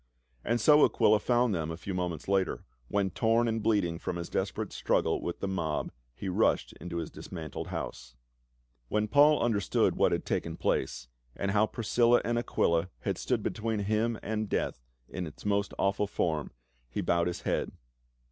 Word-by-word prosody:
And 120 Hz, +1 st, +1 dB
so 150 Hz, +6 st, +6 dB
Aquila 105 Hz, 0 st, +4 dB
found 120 Hz, 0 st, +2 dB
them 80 Hz, -3 st, -2 dB
a 80 Hz, -, -4 dB
few 95 Hz, +3 st, -5 dB
moments 90 Hz, -4 st, -3 dB
later, 95 Hz, -2 st, +1 dB, 0.2 s
when 100 Hz, +2 st, 0 dB
torn 115 Hz, +3 st, +2 dB
and 115 Hz, 0 st, 0 dB
bleeding 100 Hz, -6 st, +1 dB
from 90 Hz, -, -3 dB
his 85 Hz, -1 st, -5 dB
desperate -, -, -2 dB
struggle -, -, +1 dB
with 85 Hz, -, -4 dB
the 100 Hz, -, -1 dB
mob, 85 Hz, -6 st, -2 dB, 0.2 s
he 100 Hz, -, -6 dB
rushed 90 Hz, -, +1 dB
into 85 Hz, 0 st, -5 dB
his 85 Hz, -2 st, -4 dB
dismantled 80 Hz, -5 st, -7 dB
house. -, -, -6 dB, 0.7 s
When 105 Hz, -, 0 dB
Paul 145 Hz, +5 st, +6 dB
understood 110 Hz, -4 st, +2 dB
what -, -, +3 dB
had -, -, -1 dB
taken 85 Hz, 0 st, -2 dB
place, -, -, -1 dB, 0.3 s
and 100 Hz, -, -1 dB
how 105 Hz, +1 st, +3 dB
Priscilla 120 Hz, +2 st, +3 dB
and 120 Hz, 0 st, +1 dB
Aquila 85 Hz, -6 st, +1 dB
had -, -, -2 dB
stood -, -, -1 dB
between 110 Hz, -1 st, -2 dB
him 110 Hz, +3 st, 0 dB
and 110 Hz, -1 st, -2 dB
death 65 Hz, -, -1 dB, 0.3 s
in 90 Hz, -2 st, -5 dB
its 75 Hz, -, -12 dB
most 100 Hz, -1 st, +1 dB
awful 100 Hz, +1 st, +1 dB
form,* 80 Hz, -6 st, -1 dB, 0.4 s
he -, -, -3 dB
bowed 85 Hz, 0 st, +2 dB
his 90 Hz, -, -3 dB
head. -, -, -1 dB
100 Hz, 175 wpm, -30 LUFS, 85-110 Hz, 0.7 s, so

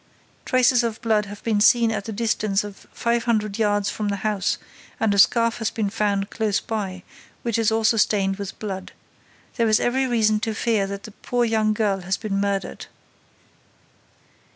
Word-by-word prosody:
Traces 255 Hz, -2 st, +4 dB
of 230 Hz, -2 st, -2 dB
blood 215 Hz, -2 st, +2 dB
have 205 Hz, +1 st, -10 dB
been 215 Hz, -3 st, +1 dB
seen 230 Hz, +1 st, +5 dB
at 215 Hz, -1 st, -4 dB
a -, -, -2 dB
distance 215 Hz, -2 st, 0 dB
of 205 Hz, -1 st, -11 dB
five 235 Hz, 0 st, -1 dB
hundred 215 Hz, -3 st, 0 dB
yards 205 Hz, -2 st, +1 dB
from 215 Hz, -, -3 dB
the 200 Hz, -, 0 dB
house 205 Hz, -3 st, 0 dB, 0.4 s
and 220 Hz, -2 st, +2 dB
a 200 Hz, -, +1 dB
scarf 230 Hz, +3 st, +4 dB
has 225 Hz, -, 0 dB
been 210 Hz, -3 st, -2 dB
found 205 Hz, -2 st, -1 dB
close 215 Hz, -3 st, 0 dB
by, 195 Hz, -5 st, -4 dB, 0.4 s
which 230 Hz, -1 st, 0 dB
is 225 Hz, -1 st, +2 dB
also 225 Hz, 0 st, +2 dB
stained 195 Hz, -2 st, +2 dB
with 200 Hz, -1 st, -6 dB
blood. 190 Hz, -3 st, -6 dB, 0.6 s
There 230 Hz, -2 st, +2 dB
is 215 Hz, -, +4 dB
every 260 Hz, +2 st, +1 dB
reason 215 Hz, -3 st, +2 dB
to 220 Hz, 0 st, -3 dB
fear 215 Hz, -3 st, +1 dB
that 200 Hz, 0 st, -6 dB
the 220 Hz, -, -9 dB
poor 245 Hz, +4 st, -1 dB
young 220 Hz, -1 st, +1 dB
girl 205 Hz, -3 st, +1 dB
has 190 Hz, +2 st, -2 dB
been 210 Hz, -3 st, -3 dB
murdered. 200 Hz, -1 st, -3 dB
215 Hz, 180 wpm, -23 LUFS, 200-230 Hz, 0.6 s, seen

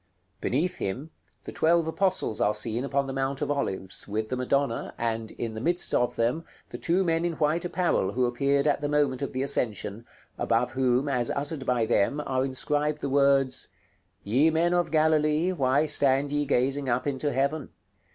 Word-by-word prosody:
Beneath 160 Hz, +9 st, 0 dB
him, 130 Hz, +11 st, -4 dB, 0.3 s
the -, -, -7 dB
twelve 165 Hz, +1 st, +2 dB
apostles 185 Hz, -, -1 dB
are 105 Hz, +1 st, +2 dB
seen 110 Hz, +3 st, -1 dB
upon 140 Hz, 0 st, 0 dB
the 135 Hz, -, -5 dB
Mount 135 Hz, 0 st, -2 dB
of -, -, -1 dB
Olives, 95 Hz, -9 st, -1 dB
with 110 Hz, +1 st, -3 dB
the 130 Hz, -, -1 dB
Madonna, 130 Hz, -1 st, -1 dB
and, 115 Hz, -1 st, -2 dB
in 115 Hz, -1 st, -4 dB
the 110 Hz, -, -6 dB
midst 175 Hz, +6 st, +1 dB
of 125 Hz, 0 st, +1 dB
them, 120 Hz, +8 st, 0 dB, 0.3 s
the -, -, -8 dB
two 180 Hz, +3 st, +1 dB
men 165 Hz, -1 st, +1 dB
in 175 Hz, -1 st, 0 dB
white 155 Hz, +2 st, 0 dB
apparel 175 Hz, -, 0 dB
who 125 Hz, +1 st, +1 dB
appeared 140 Hz, +3 st, +1 dB
at 145 Hz, -1 st, +1 dB
the 145 Hz, -, -1 dB
moment 145 Hz, -3 st, +1 dB
of -, -, -3 dB
the 130 Hz, +1 st, -2 dB
Ascension, 115 Hz, -4 st, -1 dB, 0.3 s
above 115 Hz, +2 st, +1 dB
whom, 130 Hz, +1 st, +1 dB
as 125 Hz, -4 st, +1 dB
uttered 145 Hz, -1 st, -3 dB
by 120 Hz, -2 st, +2 dB
them, 120 Hz, +5 st, +1 dB
are 130 Hz, -1 st, 0 dB
inscribed 145 Hz, +3 st, -1 dB
the 140 Hz, -, -2 dB
words, 135 Hz, -1 st, +2 dB, 0.6 s
"Ye 130 Hz, +10 st, +3 dB
men 165 Hz, +2 st, +1 dB
of 175 Hz, -1 st, +1 dB
Galilee, 155 Hz, +2 st, +2 dB
why 140 Hz, -3 st, +2 dB
stand 140 Hz, -1 st, +2 dB
ye 145 Hz, 0 st, 0 dB
gazing 135 Hz, +1 st, 0 dB
up 125 Hz, +1 st, 0 dB
into 145 Hz, +1 st, -1 dB
heaven? 140 Hz, +2 st, -1 dB
140 Hz, 185 wpm, -27 LUFS, 125-150 Hz, 0.6 s, Ye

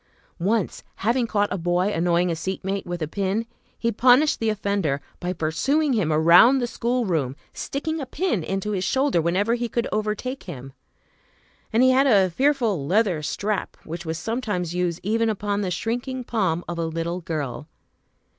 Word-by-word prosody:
Once, 200 Hz, +3 st, 0 dB, 0.2 s
having 235 Hz, +1 st, +2 dB
caught 205 Hz, -2 st, 0 dB
a 195 Hz, -, -3 dB
boy 175 Hz, +3 st, +1 dB
annoying 175 Hz, +1 st, +2 dB
a -, -, -1 dB
seat 185 Hz, +4 st, -4 dB
mate 195 Hz, 0 st, -2 dB
with 175 Hz, -2 st, -3 dB
a -, -, -2 dB
pin, 200 Hz, +6 st, -1 dB, 0.3 s
he 235 Hz, -, 0 dB
punished 255 Hz, +7 st, +4 dB
the 225 Hz, -, +1 dB
offender 200 Hz, -9 st, 0 dB, 0.2 s
by 180 Hz, 0 st, -2 dB
pursuing 265 Hz, -, +1 dB
him 195 Hz, -9 st, +1 dB
around 170 Hz, -, +7 dB
the 250 Hz, -, 0 dB
schoolroom, 215 Hz, -, -1 dB, 0.2 s
sticking 315 Hz, +3 st, -3 dB
a 270 Hz, -, -5 dB
pin 260 Hz, -, -1 dB
into 195 Hz, +4 st, -2 dB
his 190 Hz, -3 st, -1 dB
shoulder 265 Hz, -5 st, +2 dB
whenever 190 Hz, +7 st, +1 dB
he 240 Hz, 0 st, -1 dB
could 235 Hz, +1 st, -1 dB
overtake 215 Hz, +5 st, -2 dB
him. 135 Hz, -6 st, -8 dB, 1.0 s
And 225 Hz, +3 st, +4 dB
he 260 Hz, -, +6 dB
had 270 Hz, +2 st, +4 dB
a 195 Hz, -7 st, +4 dB
fearful 235 Hz, -, +1 dB
leather 190 Hz, -3 st, +2 dB
strap, 200 Hz, +6 st, -2 dB
which 170 Hz, +2 st, -6 dB
was 160 Hz, -1 st, -3 dB
sometimes 205 Hz, -3 st, -2 dB
used 175 Hz, -1 st, -1 dB
even 225 Hz, +3 st, +1 dB
upon 205 Hz, -1 st, -1 dB
the 190 Hz, -, -1 dB
shrinking 245 Hz, +7 st, -3 dB
palm 190 Hz, -8 st, 0 dB
of 175 Hz, -1 st, -4 dB
a 165 Hz, -, 0 dB
little 165 Hz, +2 st, -3 dB
girl. 150 Hz, -3 st, -4 dB
200 Hz, 175 wpm, -24 LUFS, 170-235 Hz, 1.0 s, around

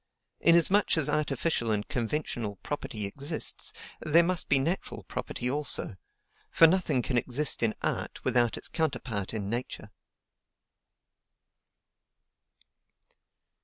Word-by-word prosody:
Inasmuch 170 Hz, +4 st, +4 dB
as 150 Hz, -2 st, +2 dB
artificial 145 Hz, -4 st, 0 dB
and 105 Hz, -1 st, -1 dB
conventional 120 Hz, -4 st, -3 dB
property 135 Hz, -7 st, -2 dB
exists, 140 Hz, +10 st, -2 dB, 0.3 s
there 160 Hz, +3 st, +4 dB
must 180 Hz, 0 st, -1 dB
be 140 Hz, -, +5 dB
natural 165 Hz, +8 st, -2 dB
property 125 Hz, -, -4 dB
also; 140 Hz, -6 st, 0 dB, 0.5 s
for 165 Hz, -, +6 dB
nothing 160 Hz, -7 st, +2 dB
can 125 Hz, -1 st, +1 dB
exist 135 Hz, +5 st, 0 dB
in 115 Hz, -2 st, +1 dB
art -, -, -3 dB
without 120 Hz, -2 st, +2 dB
its -, -, -3 dB
counterpart 125 Hz, -, -2 dB
in 105 Hz, -3 st, -4 dB
Nature." 120 Hz, +4 st, -5 dB
135 Hz, 105 wpm, -29 LUFS, 115-160 Hz, 0.5 s, for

